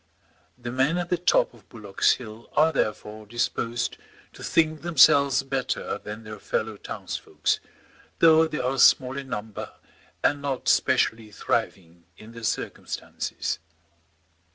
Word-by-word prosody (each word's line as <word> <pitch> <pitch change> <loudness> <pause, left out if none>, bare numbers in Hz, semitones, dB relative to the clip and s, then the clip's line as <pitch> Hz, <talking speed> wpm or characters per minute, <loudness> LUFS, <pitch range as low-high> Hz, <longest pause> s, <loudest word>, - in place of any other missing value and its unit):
The 120 -1 -6
men 135 +7 +1
at 175 0 -3
the 180 - +3
top 175 - +3
of 110 -4 -20
Bullock's 105 -4 +1
Hill 110 -1 -10
are 160 +1 +4
therefore 110 -5 -3
disposed 120 +1 -2 0.4
to - - -13
think 155 -1 +1
themselves 140 -5 +5
better 135 -1 -2
than 105 +2 -8
their 110 -1 -9
fellow 110 0 -2
townsfolks, - - -3 0.6
though 160 -1 +6
they 155 - -4
are 130 +1 -1
small 130 0 +5
in 135 -1 -6
number 110 -3 -5 0.5
and 145 -1 +2
not 140 -3 -3
specially 115 -1 +2
thriving 95 -6 -3
in 110 +1 -13
their 115 0 -10
circumstances. 110 - -3
120 Hz, 130 wpm, -25 LUFS, 110-140 Hz, 0.6 s, though